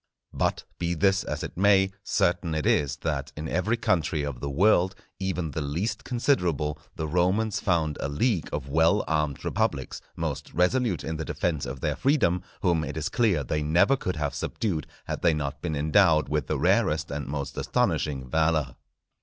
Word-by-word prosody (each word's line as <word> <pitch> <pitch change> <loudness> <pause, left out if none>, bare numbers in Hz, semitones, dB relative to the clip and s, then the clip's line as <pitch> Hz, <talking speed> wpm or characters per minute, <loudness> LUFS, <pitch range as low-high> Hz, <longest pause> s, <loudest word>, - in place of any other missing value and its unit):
But, - - 0 0.2
be 85 0 -1
this 95 +3 +2
as 75 +3 -4
it - - -6
may, 95 +1 +4
certain 90 -5 +1
it 75 - -1
is 70 -1 +2
that 75 -2 -2
in 75 +1 -4
every 105 +8 0
country 80 -7 0
of 70 -4 -4
the 70 - -4
world, 95 +4 +3 0.2
even 90 -5 -2
the 75 - -3
least 80 +10 -2
considerable, 85 - 0 0.2
the 80 - -3
Romans 95 +6 +1
found 80 -5 0
a 70 - -2
league 90 - 0
of 75 -2 -4
well 80 +8 +3
armed 75 -3 -1
republics, - - -1
most - - -4
resolute 90 - +2
in 80 0 -3
the 80 - -3
defence 80 -5 -2
of 65 -1 -6
their - - 0
freedom, 130 - +2 0.2
whom 85 -4 +2
it 75 +1 -5
is 75 - -2
clear 110 - +2
they 75 +4 -1
never 80 - +4
could 90 -8 -3
have 75 -3 -2
subdued 85 -10 -2 0.2
had - - -4
they 80 - +3
not 70 -2 -4
been 80 -3 -2
endowed 80 +1 +3
with 75 -3 -1
the - - 0
rarest 80 +1 +2
and 70 -1 -4
most 70 -1 -4
astonishing 70 -4 0
valour. 80 -4 +1
80 Hz, 180 wpm, -26 LUFS, 75-95 Hz, 0.2 s, may